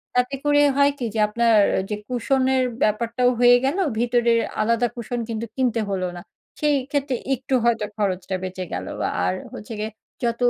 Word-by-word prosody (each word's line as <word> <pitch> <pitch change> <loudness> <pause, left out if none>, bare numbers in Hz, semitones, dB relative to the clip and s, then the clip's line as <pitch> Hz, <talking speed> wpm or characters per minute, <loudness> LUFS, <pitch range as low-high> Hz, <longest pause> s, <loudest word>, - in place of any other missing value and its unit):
তাতে 250 +2 +1
করে 290 0 +4
হয় 280 0 +4
কি 250 - -3
যে 220 - -2
আপনার 230 +2 +2 0.2
ঐ - - +2
যে 210 - -1
কুশনের 260 +1 +1 0.2
ব্যাপারটাও 235 +3 +1
হয়ে 245 0 +7
গেল। 280 +7 0 0.2
ভিতরের 235 -1 +3 0.2
আলাদা 230 +2 +2
কুশন 240 0 -4
কিন্তু 225 0 -3
কিনতে 240 -4 +1
হল 190 -2 -1
না। - - -7 0.4
সেই 300 -1 +2 0.2
ক্ষেত্রে 280 -2 0 0.2
একটু 260 +2 -6
হয়তো 225 -3 +2
খরচটা 190 -2 -1
বেঁচে 185 0 -4
গেল। - - -4 0.4
আর 90 - +1 0.2
হচ্ছে 220 +2 -8
গিয়ে 215 +1 -3 0.3
যত 235 0 -1
235 Hz, 170 wpm, -23 LUFS, 215-255 Hz, 0.4 s, হয়ে